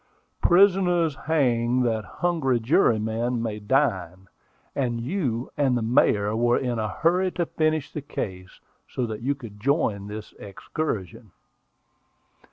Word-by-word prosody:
"'Prisoners 175 -4 +4
hang 125 -5 +2
that 110 -3 0 0.2
hungry 160 -9 +1
jurymen 115 - +1
may 110 -2 -3
dine,' 95 - 0 0.5
and 120 -4 -1
you 125 - -2
and 135 -4 +2
the - - -1
Mayor 105 -3 +2
were 120 +1 +3
in 120 -3 -2
a 110 -1 -1
hurry 180 +3 +1
to 175 - -1
finish 155 -2 -1
the 150 - -4
case, 95 -9 -6 0.3
so 125 - -2
that 110 -1 -5
you 140 +4 0
could 110 -6 -11
join 110 -6 0
this 105 +1 -8
excursion." 100 - -5
120 Hz, 130 wpm, -25 LUFS, 110-150 Hz, 0.5 s, Prisoners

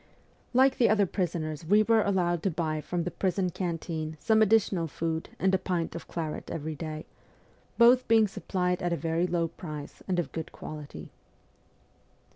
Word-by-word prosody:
Like 260 +1 +4
the 240 - +5
other 205 -2 +4
prisoners 165 -4 -3
we 205 +6 +4
were 225 0 +4
allowed 175 -4 +1
to 195 - +1
buy 155 -2 -2
from 170 +3 -2
the 180 - -3
prison 185 -1 0
canteen 165 -3 -3
some 220 -1 +3
additional 205 -5 +3
food 160 +2 -3
and 190 0 +1
a 190 - +3
pint 175 -3 -2
of 170 - -7
claret 160 -3 -4
every 160 0 -4
day, 155 0 -6 0.7
both 245 +2 +6
being 225 -1 +5
supplied 180 -2 -2
at 175 - -1
a - - 0
very 165 +2 0
low 170 -1 0
price 155 -4 -8
and 185 -2 0
of 160 -7 -1
good 160 -1 -5
quality. 145 - -9
175 Hz, 170 wpm, -28 LUFS, 160-195 Hz, 0.7 s, both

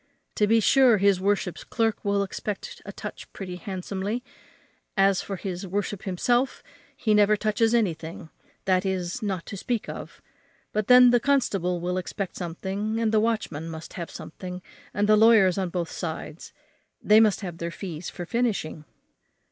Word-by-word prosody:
To 210 - +2
be 225 +2 +5
sure 250 0 +5
his 195 -1 +3
worship's 195 -2 0
clerk 225 -2 -1
will 200 0 +1
expect 200 +1 -5
to - - -7
touch - - -8
pretty 180 -2 -6
handsomely; 195 +5 -4 0.7
as 195 -1 +4
for 195 - -5
his 185 0 -5
worship 205 +1 -3
himself, 240 +7 0 0.3
he 220 -3 +1
never 210 0 +5
touches 220 +2 +2
anything, 165 -7 -2 0.3
that 185 -1 +2
is, 190 +2 -2
not 190 -5 -2
to - - -7
speak 230 +3 -2
of; - - -8 0.5
but 215 -1 -1
then 250 -1 +8
the 245 - +5
constable 200 -10 +1
will 180 +2 -1
expect 190 +1 -5
something, 195 +6 -3
and 225 -1 +1
the 220 - +4
watchman 215 -8 -1
must 160 0 -8
have 170 -3 -5
something, 180 +2 -8 0.3
and 205 0 0
the 215 - +6
lawyers 210 -4 +5
on 185 -2 -1
both 170 -2 -3
sides, 160 -1 -6 0.5
they 215 +1 +5
must 215 -2 +3
have 175 -4 -6
their 170 - -3
fees 170 -2 -6
for 175 - -7
finishing." 195 -9 -1
195 Hz, 165 wpm, -26 LUFS, 180-215 Hz, 0.7 s, then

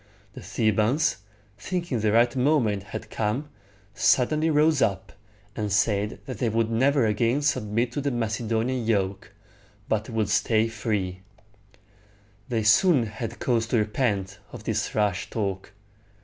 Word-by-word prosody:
The - - -9
Thebans, 110 +8 +1 0.4
thinking 170 - -2
the 105 0 +1
right 120 +2 +3
moment 125 -7 +2
had 100 - -8
come, 115 +7 -2 0.4
suddenly 155 +9 +2
rose 150 -1 +3
up, 95 -2 0 0.4
and 105 -1 -3
said 105 +1 +1
that 130 - -7
they 120 - +1
would 115 0 0
never 130 +2 +3
again 115 +6 +1
submit 115 -3 0
to 145 - -3
the 140 - 0
Macedonian 115 +1 -1
yoke, 100 -4 -1 0.6
but 110 +2 -1
would 110 -3 -1
stay 110 +1 +2
free. 105 -5 -3 1.3
They 115 -3 0
soon 130 - +4
had 110 +2 -6
cause 115 0 0
to 120 - +1
repent 105 -3 -1
of - - -9
this - - -2
rash 100 -4 0
talk. 100 -3 -3
115 Hz, 135 wpm, -25 LUFS, 105-125 Hz, 1.3 s, soon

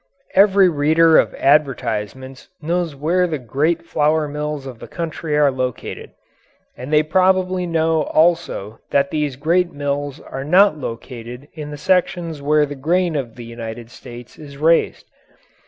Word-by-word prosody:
Every 195 -1 +5
reader 160 +1 +4
of - - 0
advertisements 130 -3 -1
knows 170 -1 -2
where 175 +6 +1
the 160 -3 -2
great 150 +7 -1
flour 155 0 +1
mills 150 -1 -4
of 125 -4 -9
the - - -10
country 160 -2 -3
are 145 -2 +4
located. 130 -2 -5 0.7
And 130 +4 -8
they 155 0 +4
probably 185 +2 +1
know 160 -1 +1
also 160 - 0
that 140 0 +1
these 150 -3 -1
great 170 +6 +1
mills 145 0 -3
are 135 - -7
not 180 +4 +4
located 125 0 -8
in 150 -2 -7
the 145 - -7
sections 175 -2 0
where 150 +1 +3
the 145 - -7
grain 170 +5 0
of 125 -6 -4
the 120 - -9
United 115 0 -8
States 120 -1 -12
is 140 -2 -11
raised. 165 +3 +2
150 Hz, 150 wpm, -19 LUFS, 135-165 Hz, 0.7 s, Every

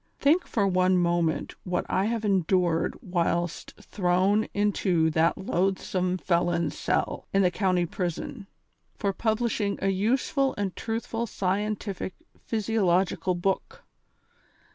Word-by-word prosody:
Think 325 +6 +3
for 205 -4 +1
one 185 -1 +3
moment 170 -2 +1
what 180 -1 -1
I 190 - +1
have 225 0 -1
endured 180 -3 +1
whilst 175 -1 -1
thrown 190 +3 +1
into 185 -5 +1
that 160 +2 +2
loathsome 185 -1 0
felon's 170 -3 0
cell, - - -1
in 195 0 +3
the 180 - +3
county 185 -2 +1
prison, 185 - -4 0.5
for 200 -2 0
publishing 220 -2 0
a 195 - +1
useful 255 +7 +1
and 200 -2 -2
truthful 230 +1 -3
scien 205 +2 -1
tific 195 -2 -5 0.3
physiological 190 -4 +1
book. 195 - -2
190 Hz, 120 wpm, -27 LUFS, 175-210 Hz, 0.5 s, Think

